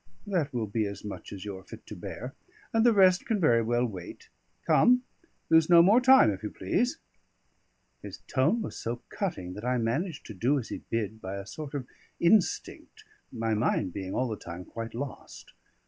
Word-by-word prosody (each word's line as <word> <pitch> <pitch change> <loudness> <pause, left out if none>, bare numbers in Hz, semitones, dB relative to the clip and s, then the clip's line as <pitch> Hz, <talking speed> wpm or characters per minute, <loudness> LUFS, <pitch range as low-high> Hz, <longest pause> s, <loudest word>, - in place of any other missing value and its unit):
"That 175 -8 -1
will 120 -3 -2
be 105 +1 -1
as 100 0 -8
much 105 - -7
as 100 0 -8
you 100 -2 -5
are - - -16
fit - - -12
to - - -9
bear, - - -7 0.4
and 225 0 +3
the 240 - +6
rest 190 -3 +4
can 225 -3 +1
very 120 -9 +4
well 120 +2 +1
wait. 95 -7 -8 0.4
Come, 250 +1 +5 0.4
lose 160 0 +4
no 170 -1 +8
more 210 +7 +5
time, 260 - +7
if 95 - -6
you 105 - -4
please." 250 +6 -1 1.0
His - - -8
tone 145 - +1
was - - -6
so 120 +1 -5
cutting 95 - -4
that 105 - -8
I 125 +1 +1
managed 140 +9 -2
to 110 - -8
do 125 +9 +1
as 125 - -4
he - - -5
bid 110 -1 -2
by 95 +1 -5
a 100 0 -6
sort 145 +7 -7
of 135 -3 -3 0.3
instinct, 180 +2 +1 0.3
my 115 0 -1
mind 105 -4 0
being 95 -1 -5
all 130 - +1
the 110 -2 -4
time 90 +1 -8
quite 115 +3 -7
lost. 140 +3 -8
120 Hz, 195 wpm, -28 LUFS, 105-175 Hz, 1.0 s, no